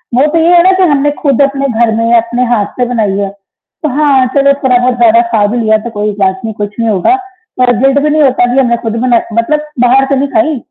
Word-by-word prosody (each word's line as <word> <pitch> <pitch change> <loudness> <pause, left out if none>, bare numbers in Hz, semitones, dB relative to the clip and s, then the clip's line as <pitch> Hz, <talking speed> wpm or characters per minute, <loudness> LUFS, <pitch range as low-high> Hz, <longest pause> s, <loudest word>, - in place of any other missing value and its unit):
वो 260 +4 +3
तो 330 - +1
ये 330 - +2
है 345 - +6
ना 375 - +4
कि 380 - +2
हमने 290 0 +1
खुद 280 -3 +1
अपने 275 0 0
घर 235 -2 0
में 230 +1 -1
या 235 - +4
अपने 240 +2 -3
हाथ 235 -4 0
से 250 - +1
बनाई 220 -5 -2
है। 200 -1 -2 0.5
तो 305 - 0
हाँ 285 -3 +2
चलो 280 0 +3
थोड़ा-बहुत 250 -1 +1
ज़्यादा 235 -1 +4
खा 215 -3 +1
भी 245 - -2
लिया 220 -1 +2
तो 235 - -4
कोई 210 +1 -1
बात 190 -1 0
नहीं 220 - -4
कुछ 205 0 -4
नहीं 230 -1 0
होगा। 210 - +1 0.4
पर 250 -1 +3
गिल्ट 270 +3 +2
भी 300 +1 0
नहीं 305 +1 +1
होता 260 -3 +2
की 270 - +2
अब 265 - +2
मई 235 - +2
खुद 225 -1 -3
बनाती 235 -3 -1
मतलब 300 +7 -1 0.2
बाहर 265 +2 +3
से - - +3
नहीं 280 - -1
खाई। 315 -6 0
245 Hz, 265 wpm, -10 LUFS, 225-280 Hz, 0.5 s, है